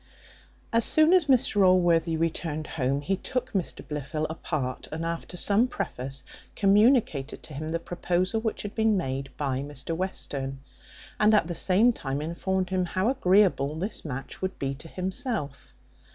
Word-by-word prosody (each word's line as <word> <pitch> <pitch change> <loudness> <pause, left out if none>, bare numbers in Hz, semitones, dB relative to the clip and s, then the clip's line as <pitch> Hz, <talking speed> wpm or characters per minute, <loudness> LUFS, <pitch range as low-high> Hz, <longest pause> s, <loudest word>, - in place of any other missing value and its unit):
As 230 0 +4
soon 315 +7 +6
as 365 -4 +5
Mr 245 -7 +3
Allworthy 170 -3 +3
returned 160 -1 -2
home, 140 -2 -1
he 190 +6 -1
took 255 +4 -3
Mr 190 -4 -3
Blifil 150 +1 -3
apart, 140 -5 -4
and 160 +2 -4
after 170 +1 -4
some 210 +7 +4
preface, 135 - -5 0.3
communicated 200 - +3
to 155 - -9
him 155 +3 -5
the 165 - 0
proposal 180 +5 -1
which 220 -1 -2
had 205 - -6
been 220 -2 +2
made 135 -5 -3
by 135 -3 -1
Mr 145 +3 -3
Western, 140 -7 -4 0.6
and 215 +1 +5
at 210 - +3
the 175 - -4
same 200 +8 +3
time 135 -7 -4
informed 185 +4 -2
him 185 -1 +1
how 185 +5 0
agreeable 185 - +3
this 195 +7 -3
match 135 -3 -6
would 190 0 -3
be 135 0 -2
to 145 +4 -10
himself. 185 - -3
175 Hz, 160 wpm, -27 LUFS, 145-200 Hz, 0.6 s, soon